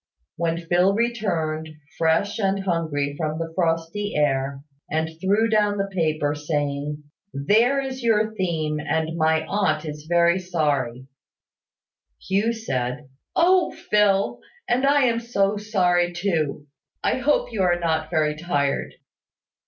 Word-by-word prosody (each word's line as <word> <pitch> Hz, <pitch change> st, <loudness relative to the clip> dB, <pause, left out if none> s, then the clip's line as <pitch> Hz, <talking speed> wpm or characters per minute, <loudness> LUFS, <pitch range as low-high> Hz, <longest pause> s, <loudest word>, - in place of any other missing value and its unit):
When 165 Hz, 0 st, -1 dB
Phil 175 Hz, +3 st, +2 dB
returned, 175 Hz, -10 st, -1 dB, 0.3 s
fresh 165 Hz, +7 st, +1 dB
and 195 Hz, -1 st, +1 dB
hungry 155 Hz, -6 st, -1 dB
from 155 Hz, 0 st, -2 dB
the 165 Hz, 0 st, -5 dB
frosty 165 Hz, +4 st, -1 dB
air, 135 Hz, -2 st, 0 dB, 0.3 s
and 160 Hz, +1 st, -1 dB
threw 205 Hz, +4 st, +3 dB
down 210 Hz, -2 st, +2 dB
the 195 Hz, 0 st, -1 dB
paper, 155 Hz, -5 st, 0 dB
saying, 145 Hz, -1 st, -3 dB, 0.3 s
"There 220 Hz, -, +3 dB
is 265 Hz, -1 st, -4 dB
your 220 Hz, -2 st, +2 dB
theme, 160 Hz, -6 st, -1 dB
and 160 Hz, +2 st, -1 dB
my 160 Hz, -1 st, +2 dB
aunt 160 Hz, -5 st, 0 dB
is 150 Hz, 0 st, -7 dB
very 175 Hz, +1 st, +4 dB
sorry," 145 Hz, -9 st, -1 dB, 1.1 s
Hugh 200 Hz, +4 st, 0 dB
said, 135 Hz, -, -3 dB, 0.3 s
"Oh! 360 Hz, +1 st, +3 dB, 0.2 s
Phil, 200 Hz, -2 st, +3 dB, 0.3 s
and 255 Hz, +3 st, +2 dB
I 285 Hz, 0 st, +4 dB
am 235 Hz, -2 st, +2 dB
so 210 Hz, -4 st, 0 dB
sorry 180 Hz, -4 st, +1 dB
too! 165 Hz, -6 st, -1 dB, 0.4 s
I -, -, +1 dB
hope -, -, +1 dB
you 210 Hz, -, -1 dB
are 175 Hz, -2 st, +3 dB
not 160 Hz, -2 st, -1 dB
very 155 Hz, -2 st, +1 dB
tired." 145 Hz, -4 st, -1 dB
170 Hz, 130 wpm, -23 LUFS, 155-205 Hz, 1.1 s, very